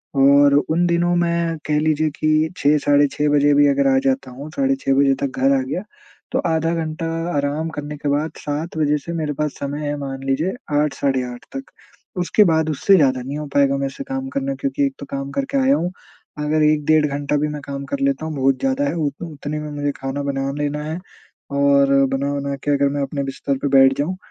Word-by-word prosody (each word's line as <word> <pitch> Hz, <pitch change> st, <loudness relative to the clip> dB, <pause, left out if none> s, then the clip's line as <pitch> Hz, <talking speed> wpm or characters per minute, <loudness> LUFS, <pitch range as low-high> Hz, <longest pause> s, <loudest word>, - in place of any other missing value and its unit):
और 140 Hz, +1 st, +5 dB, 0.2 s
उन 170 Hz, +3 st, +2 dB
दिनों 175 Hz, +1 st, +2 dB
मैं 170 Hz, -1 st, 0 dB
कह 150 Hz, 0 st, +1 dB
लीजिए 155 Hz, 0 st, +1 dB
कि 155 Hz, +1 st, +2 dB
6 150 Hz, +1 st, +3 dB
साढ़े 145 Hz, 0 st, +4 dB
6 150 Hz, 0 st, 0 dB
बजे 145 Hz, 0 st, +4 dB
भी 145 Hz, 0 st, +5 dB
अगर 140 Hz, 0 st, +2 dB
आ -, -, +4 dB
जाता 130 Hz, -1 st, 0 dB
हूँ 140 Hz, +5 st, -8 dB
साढ़े 275 Hz, 0 st, +2 dB
6 135 Hz, -, 0 dB
बजे 140 Hz, 0 st, +4 dB
तक 135 Hz, -2 st, -3 dB
घर 135 Hz, +1 st, +4 dB
आ 130 Hz, -, 0 dB
गया 140 Hz, +9 st, -4 dB, 0.5 s
तो -, -, 0 dB
आधा 165 Hz, 0 st, +1 dB
घंटा 160 Hz, 0 st, -3 dB, 0.3 s
आराम 145 Hz, +3 st, -1 dB
करने 150 Hz, -1 st, -6 dB
के 145 Hz, 0 st, -3 dB
बाद 150 Hz, +2 st, 0 dB
7 150 Hz, +3 st, -4 dB
बजे 150 Hz, -1 st, +2 dB
से 170 Hz, +4 st, -7 dB
मेरे 155 Hz, -3 st, -2 dB
पास 150 Hz, +1 st, -2 dB
समय 145 Hz, +2 st, -4 dB
है 145 Hz, -, -1 dB
मान 135 Hz, -1 st, -6 dB
लीजिए 140 Hz, +7 st, 0 dB, 0.3 s
8 150 Hz, -1 st, +1 dB
साढ़े 135 Hz, -2 st, 0 dB
8 120 Hz, -, -11 dB
तक। 270 Hz, -, -4 dB, 0.6 s
उसके 180 Hz, +4 st, +4 dB
बाद 160 Hz, -2 st, +2 dB
उससे 175 Hz, +6 st, +3 dB
ज़्यादा 130 Hz, -6 st, +3 dB
नहीं 140 Hz, +4 st, -5 dB
हो 150 Hz, -, -4 dB
पाएगा 140 Hz, -1 st, +3 dB
मेरे 135 Hz, 0 st, -1 dB
से -, -, -7 dB
काम 270 Hz, -1 st, -4 dB
करना 275 Hz, 0 st, -2 dB
क्योंकि 280 Hz, +1 st, -1 dB
एक 275 Hz, -, -2 dB
तो -, -, -7 dB
काम 135 Hz, 0 st, -4 dB
करके 275 Hz, 0 st, -2 dB
आया 270 Hz, +1 st, +4 dB
हूँ। 175 Hz, -6 st, -2 dB, 0.5 s
अगर 155 Hz, +1 st, +2 dB
1 150 Hz, -1 st, +2 dB
डेढ़ 155 Hz, 0 st, +4 dB
घंटा 145 Hz, +1 st, -2 dB
भी 150 Hz, -, 0 dB
मैं 150 Hz, -1 st, -5 dB
काम 140 Hz, -1 st, -5 dB
कर 280 Hz, -, -4 dB
लेता 275 Hz, -11 st, 0 dB
हूँ 160 Hz, -1 st, -4 dB
बहुत 135 Hz, -1 st, +1 dB
ज़्यादा 270 Hz, +1 st, 0 dB
है -, -, -1 dB
उत 145 Hz, -2 st, -3 dB
उतने 150 Hz, -1 st, -5 dB
में 150 Hz, -, -6 dB
मुझे 145 Hz, 0 st, -2 dB
खाना 135 Hz, +1 st, -4 dB
बना 135 Hz, -1 st, -2 dB
लेना 150 Hz, 0 st, -2 dB
है 160 Hz, +3 st, -4 dB, 0.6 s
और 140 Hz, -1 st, +4 dB, 0.2 s
बना-वना 140 Hz, 0 st, -2 dB
के 145 Hz, -, 0 dB
अगर 140 Hz, 0 st, +2 dB
मैं 145 Hz, -, -1 dB
अपने 140 Hz, 0 st, -3 dB
बिस्तर 135 Hz, 0 st, -3 dB
पे 145 Hz, -, +2 dB
बैठ 135 Hz, 0 st, +6 dB
जाऊँ, 180 Hz, +6 st, -1 dB
150 Hz, 225 wpm, -20 LUFS, 140-160 Hz, 0.6 s, बैठ